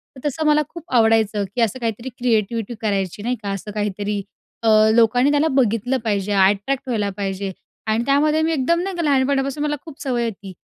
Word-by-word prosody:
तर 265 +3 -4
तसं 310 +3 -2
मला 300 0 +4
खूप 340 -2 -10
आवडायचं, 220 -2 +3
की 245 - 0
असं 230 +2 0
काहीतरी 230 +1 -3
क्रिएटिव्हिटी 230 -1 0
करायची, 200 -3 -1
नाही 245 +2 0
का? 200 - -3
असं 195 +2 -5
काहीतरी. 205 0 -2 0.4
अ, - - +1 0.3
लोकांनी 245 +4 +4
त्याला 295 +2 +3
बघितलं 245 +1 +1
पाहिजे, 205 -2 -1
अट्रॅक्ट 200 +7 +2
व्हायला 215 -5 0
पाहिजे. 195 -1 -3 0.4
आणि 220 +2 +1
त्यामध्ये 300 +3 +3
मी 320 +1 +1
एकदम 320 +4 +1
नाही 380 +1 -3
का, 345 - -2
लहानपणापासून 275 0 +1
मला 295 0 0
खूप 315 -4 -11
सवय 245 -3 -1
होती. 200 -4 -6
235 Hz, 185 wpm, -21 LUFS, 205-275 Hz, 0.4 s, मला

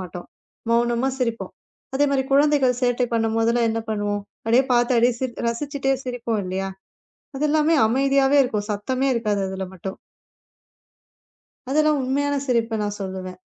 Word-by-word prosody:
மாட்டோம். 180 -1 -8 0.4
மௌனமா 235 +2 +2
சிரிப்போம். 235 -3 -2 0.4
அதே 285 +2 +3
மாதிரி 270 -1 +1
குழந்தைகள் 275 -3 +3
சேட்டை 245 0 +2
பண்ணும்போதெல்லாம் 225 +1 +1
என்ன 225 - -1
பண்ணுவோம். 205 -1 -1 0.2
அப்டியே 240 +4 +4
பாத்து 240 +1 +3
அடி 240 +2 +4 0.4
ரசிச்சிட்டு 275 +2 -1
சிரிப்போம் 235 -4 -2
இல்லையா? 190 +1 -3 0.7
அது 295 +3 +1
எல்லாமே 310 +1 +3
அமைதியாவே 275 +3 +3
இருக்கும். 210 -4 -2
சத்தமே 255 +6 -1
இருக்காது 210 -4 0
அதுல 190 0 -4
மட்டும். 190 +1 -6 1.7
அதுதான் 305 +1 +3
உண்மையான 285 +2 0
சிரிப்பு 230 -3 0
நான் 205 0 -4
சொல்லுவேன். 185 -1 -6
240 Hz, 130 wpm, -23 LUFS, 210-270 Hz, 1.7 s, அப்டியே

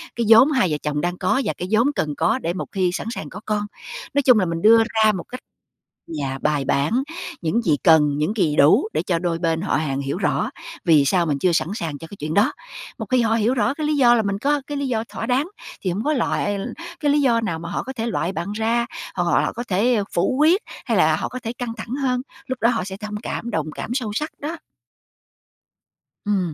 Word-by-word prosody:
cái 235 - -1
vốn 230 +6 +8
hai 250 - +2
vợ 150 - 0
chồng 150 -1 -1
đang 175 +2 -2
có 195 +9 +1
và - - 0
cái 180 - -4
vốn 230 +5 +4
cần 150 -2 -1
có 175 +10 +2
để 170 -8 -2
một 180 - -4
khi 185 -2 +1
sẵn - - -4
sàng 155 - -6
có 190 - -8
con. 210 -1 0 0.5
Nói 285 - +3
chung 250 -5 +5
là 185 - +2
mình 165 -1 -3
đưa 225 +2 +7
ra 220 -1 +3
một 185 -4 -4
cách 255 - -6 0.8
yeah, 135 0 -4
bài 150 -2 +1
bản, 145 - +1 0.4
những 210 +9 +1
gì 155 -7 +2
cần, 150 -4 +5
những 155 +7 0
gì 160 -7 +1
đủ 205 - +5
để - - 0
cho 170 -3 0
đôi 170 -1 -1
bên 165 -1 0
họ 200 - 0
hàng 140 -3 -1
hiểu 140 +4 -3
rõ 195 - 0 0.3
vì 155 -5 +5
sao 170 +5 +2
mình 145 -3 0
chưa 180 +4 +2
sẵn 160 - +1
sàng 160 -8 -4
cho 165 - -9
cái 200 - -9
chuyện 155 +2 -4
đó. 205 +4 +3 0.5
Một - - -5
khi 255 -2 +3
họ 225 0 +2
hiểu 230 +2 +2
rõ 235 +2 +1
cái 305 -1 -3
lý 300 - +1
do 245 -4 +6
là 225 - +2
mình 200 -1 -2
có 285 +4 +1
cái 290 - -4
lý 280 -1 -2
do 225 -3 -1
thỏa - - -5
đáng, 265 +7 +1 0.3
thì 185 - -1
hông 200 +6 -3
có 305 - +2
loại 205 -6 0 0.4
cái 290 -2 +2
lý 295 - +3
do 240 -5 +3
nào 195 -8 -2
mà 170 +1 -7
họ - - -2
có 265 - -6
thể 230 -3 -3
loại 195 -5 -1
bạn 195 +2 -4
ra, 230 +2 0 0.3
hoặc - - 0
họ - - +3
là - - -1
có 240 - -5
thể, 210 +7 +2
ơ, 210 -3 +1
phủ 195 +9 +1
quyết 330 +7 +5 0.3
hay - - +1
là - - +4
họ - - -3
có 255 - -6
thể 230 - -3
căng 245 -2 -3
thẳng 230 +2 -6
hơn. 250 -1 0 0.2
Lúc 260 -1 -4
đó 230 - +4
họ 225 -7 -1
sẽ 190 0 -6
thông 210 0 -6
cảm, 235 - -4
đồng 155 -7 -2
cảm - - -6
sâu 245 -5 -2
sắc 305 +7 -2
đó. 310 +4 -4 1.7
Ừm, 190 -5 0
210 Hz, 255 wpm, -22 LUFS, 170-245 Hz, 1.7 s, vốn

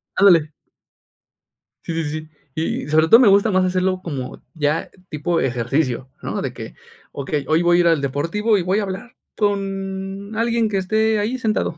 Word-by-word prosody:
Ándale. 170 -6 +5 1.3
Sí, 170 - -4
sí, 150 - -3
sí. 155 +1 -6 0.3
Y 160 -3 -2
sobre 155 +1 +4
todo 230 +8 +8
me 250 - +6
gusta 200 +2 +4
más 185 -1 +3
hacerlo 185 0 0
como 135 -6 -6
ya 150 0 -1 0.2
tipo 165 +2 -1
ejercicio, 125 +1 -1
¿no?, - - -3
de - - -4
que, - - -8 0.4
okey, 140 +1 -3
hoy 160 +2 +3
voy 175 0 +4
a - - +3
ir 170 - +3
al 165 -4 +3
deportivo 165 - 0
y 185 - -1
voy 190 +4 +1
a - - -1
hablar 195 +5 -7 0.2
con 195 0 -3
alguien 230 0 +1
que 205 -2 -1
esté 220 +3 +1
ahí 220 +5 -1
sentado, 215 -8 -1
185 Hz, 180 wpm, -20 LUFS, 155-205 Hz, 1.3 s, todo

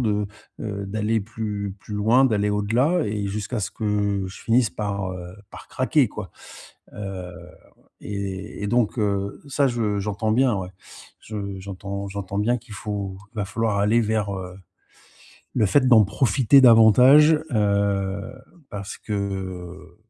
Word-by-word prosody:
de, 105 -3 0 0.3
heu, 100 -2 -4
d'aller 110 +2 0
plus 105 -2 -5
plus 105 - -8
loin, 110 +6 +4
d'aller 105 -5 +1
au-delà 120 - +1
et 105 -1 -2
jusqu'à 105 +3 -3
ce 95 - -3
que 105 -2 -1
je 95 - -10
finisse 115 0 +2
par, 100 -3 -3
heu, 90 0 -9
par - - -12
craquer, 130 0 +2
quoi. - - -8 0.6
Heu 95 -3 -6 0.7
et 100 0 -5
et - - -1
donc 120 +1 +1
heu, 100 -1 -1
ça, 140 0 +2
je 110 -5 -1
j'entends, 105 +2 -1
bien 125 0 +3
ouais, 95 -2 -4 0.5
je 100 -3 -6
j'entends 100 +1 -6
j'entends 100 0 -4
bien 120 +4 +1
qu'il 120 -2 -13
faut 100 -1 -5 0.2
va 105 -2 -2
falloir 105 +1 -1
aller 105 +4 +3
vers, 110 -2 -1
heu, 90 -1 -7 1.0
le 110 - +3
fait 130 +6 +3
d'en 115 -4 +7
profiter 120 +5 +4
davantage 125 +6 +7 0.2
heu 100 -1 0 0.4
parce 100 -1 -7
que 95 -3 -5
105 Hz, 145 wpm, -23 LUFS, 100-115 Hz, 1.0 s, d'en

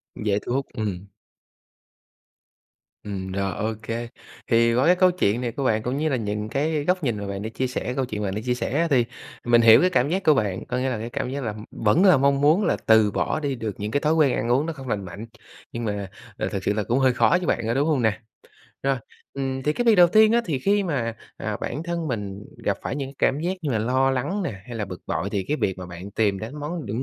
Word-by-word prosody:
Dễ 105 -1 0
thu 120 - -4
hút, 135 +1 0
ừm. 100 -5 -3 2.0
Ừm, 95 -2 -5
rồi, 100 0 -1
ô 110 +1 -1
kê. 115 +1 -4 0.4
Thì 115 0 +4
qua 130 +3 +3
cái 180 - +6
câu 185 0 +4
chuyện 120 - 0
này 120 -2 -2
của 140 - -4
bạn 110 -4 +1
cũng 125 +3 -2
như 155 +2 0
là 135 - +1
nhìn 105 -2 -3
cái 150 +3 0
góc 180 -1 +1
nhìn 120 -6 0
mà 100 - -5
bạn 100 0 -4
đã 110 - -4
chia 130 +4 -2
sẻ, 125 0 -3
câu 135 - 0
chuyện 110 -4 -5
mà - - -1
bạn 95 - -3
đã 105 - -3
chia 125 - +1
sẻ 125 +2 -2
á, 170 - +2
thì 125 -5 +3 0.4
mình 120 0 +5
hiểu 115 -1 +8
cái 180 - +4
cảm 140 -6 +2
giác 190 +4 -1
của 155 - +6
bạn, 100 -9 -1
có 125 - -3
nghĩa 130 +1 0
là 125 - -2
cái 115 +2 -5
cảm 120 - -3
giác 140 +1 -4
là, 110 - -2
ừm, 105 +1 -9
vẫn 135 - +2
là 185 -6 +7
mong 140 +1 +2
muốn 155 +8 +4
là - - +1
từ 110 -2 +5
bỏ 155 - -1
đi 140 -3 -2
được 110 -5 -4
những 105 +1 -3
cái 145 - +1
thói 155 +2 +2
quen 155 -5 +3
ăn 115 - -2
uống 135 +5 +3
nó 165 - -3
không 135 -4 -10
lành 100 -4 -2
mạnh, 95 +5 -8 0.5
nhưng 115 0 -4
mà, 100 -2 -3 0.3
à, - - -1
thực 95 - -3
sự 100 - +1
là 105 0 -1
cũng 120 +5 +1
hơi 130 -1 +4
khó - - +3
với 180 +1 +2
bạn, - - +2
có 115 - +1
đúng 140 +4 +1
hông 150 -5 +2
nè? 110 -2 +1 0.6
Rồi, 135 0 +1 0.4
ừm, 135 -1 -3
thì 150 - +1
cái 245 - -1
việc 230 -2 +6
đầu 175 -3 +7
tiên 215 +4 +5
á 235 - +4
thì 155 -9 -1
khi 200 +8 +2
mà, 130 - -2 0.2
à, - - -3
bản 145 +6 -3
thân 170 -2 -3
mình 105 -4 -4 0.2
gặp - - +1
phải - - -3
những 135 -2 -4
cảm 140 - +2
giác 175 +3 0
như 150 - -1
là 115 - +1
lo 130 +4 +2
lắng 170 +11 -1
nè, 100 - -5
hay 120 - -8
là 110 - -2
bực 90 -2 -8
bội - - -2
thì 100 - -1
cái 150 - +1
việc 95 -9 -1
mà 90 - -7
bạn 90 +3 -9
tìm 100 -2 +1
đến 115 +9 -7
món 155 +2 -4
những 110 +5 -2
125 Hz, 275 wpm, -24 LUFS, 105-150 Hz, 2.0 s, hiểu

